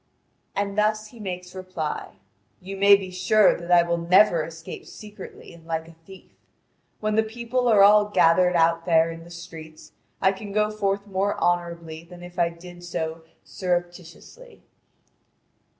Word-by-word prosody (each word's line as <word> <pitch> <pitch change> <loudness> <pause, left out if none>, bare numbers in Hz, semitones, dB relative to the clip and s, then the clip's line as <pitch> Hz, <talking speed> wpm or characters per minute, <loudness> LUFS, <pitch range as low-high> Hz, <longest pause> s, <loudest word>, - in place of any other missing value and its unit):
And 200 0 -1
he - - -10
thus 215 +1 0
makes 180 -5 -7
reply: 185 -5 -5 0.4
"You 195 +2 -8
may 200 +1 +7
be 190 -2 -5
sure 190 +3 +4
that 170 0 -9
I 175 -1 +6
will 170 0 -1
never 175 -1 +4
escape 165 +1 -9
secretly 210 -4 -11
and 165 -1 -17
like 160 -1 -3
a - - -13 0.2
thief. 190 -1 -14 0.7
When 215 0 0
the 220 - +4
people 235 +3 -2
are 210 -4 +6
all 210 +1 +6
gathered 180 -3 +3
out 165 0 +2
there 165 -1 +4
in 165 0 -10
the - - -14
streets, 165 -2 -11 0.3
I 190 - +3
can 200 +1 -8
go 210 0 +1
forth 200 -1 -1
more 200 0 -1
honourably 170 -2 -2
than 175 +1 -13
if 175 +1 -10
I 170 -1 +3
did 175 +1 -13
so 160 -2 -4 0.2
surreptitiously." 175 - -5
180 Hz, 160 wpm, -24 LUFS, 170-205 Hz, 0.7 s, may